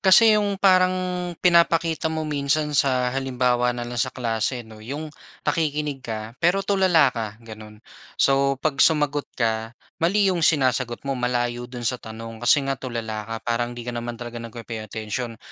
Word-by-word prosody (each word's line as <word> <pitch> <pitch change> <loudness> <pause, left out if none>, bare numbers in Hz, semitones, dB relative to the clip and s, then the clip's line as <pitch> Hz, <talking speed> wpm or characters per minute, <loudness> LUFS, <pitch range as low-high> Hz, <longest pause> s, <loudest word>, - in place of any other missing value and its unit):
kasi 215 +4 +7
'yong 205 -2 0
parang 185 -2 +5 0.5
pinapakita 170 -2 +3
mo 160 -1 -3
minsan 150 +1 0
sa 130 -2 +2
halimbawa 125 -2 +1
na 120 -1 -4
lang 120 -1 -3
sa 130 - +1
klase, 120 0 -2
'no, 110 -1 -13
'yong 145 +6 -6 0.3
nakikinig 150 -3 -1
ka 110 -1 -6
pero 185 +4 +3
tulala 185 -9 +4
ka, 110 -3 -4
gano'n. 110 -2 -11 0.4
So, 140 0 +3
'pag 140 -1 -1
sumagot 150 -2 +2
ka, 115 -1 0 0.3
mali 200 +4 +3
'yong 180 -3 0
sinasagot 130 -5 +1
mo, 135 - 0
malayo 120 -1 -1
do'n 120 -1 -7
sa 125 - +1
tanong. 115 +1 -9
Kasi 135 +3 +4
nga 135 - 0
tulala 115 -4 -5
ka, 115 - -4
parang 120 0 0
'di 120 0 -8
ka - - -2
naman 120 0 -5
talaga 120 -1 -7
nagpe-pay 115 -1 -7
attention. 110 +2 -5
125 Hz, 165 wpm, -23 LUFS, 115-155 Hz, 0.5 s, kasi